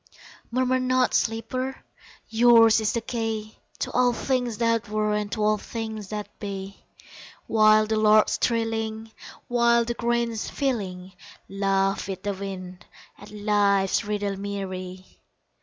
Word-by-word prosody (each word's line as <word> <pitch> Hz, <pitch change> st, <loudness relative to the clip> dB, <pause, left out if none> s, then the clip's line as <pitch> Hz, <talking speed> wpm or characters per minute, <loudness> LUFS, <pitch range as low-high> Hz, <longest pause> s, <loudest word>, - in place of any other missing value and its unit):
Murmur 255 Hz, +1 st, +1 dB
not, 255 Hz, 0 st, +1 dB
sleeper! 255 Hz, +4 st, -2 dB, 0.4 s
Yours 230 Hz, -1 st, +6 dB
is 215 Hz, -1 st, 0 dB
the 235 Hz, -, -1 dB
key 225 Hz, -2 st, -4 dB, 0.2 s
To -, -, -3 dB
all 245 Hz, 0 st, +3 dB
things 245 Hz, -3 st, -1 dB
that 230 Hz, -2 st, 0 dB
were 215 Hz, 0 st, 0 dB
and 210 Hz, -1 st, -2 dB
To 215 Hz, -, -1 dB
all 215 Hz, 0 st, +2 dB
things 220 Hz, -2 st, -6 dB
that 210 Hz, 0 st, -7 dB
be 195 Hz, -1 st, -7 dB, 0.6 s
While 215 Hz, -1 st, +5 dB
the 220 Hz, 0 st, -1 dB
lark's 215 Hz, 0 st, +4 dB
trilling, 225 Hz, -1 st, -1 dB, 0.4 s
While 235 Hz, -1 st, +3 dB
the 235 Hz, -, -2 dB
grain's 235 Hz, -1 st, -1 dB
filling, 190 Hz, -9 st, -3 dB, 0.3 s
Laugh 195 Hz, 0 st, 0 dB
with 190 Hz, -1 st, -6 dB
the 205 Hz, -1 st, -1 dB
wind 185 Hz, -2 st, -8 dB, 0.3 s
At -, -, -12 dB
Life's 205 Hz, -2 st, +1 dB
Riddle 205 Hz, -1 st, -2 dB
me 200 Hz, 0 st, -4 dB
ree! 185 Hz, 0 st, -8 dB
215 Hz, 135 wpm, -25 LUFS, 200-235 Hz, 0.6 s, Yours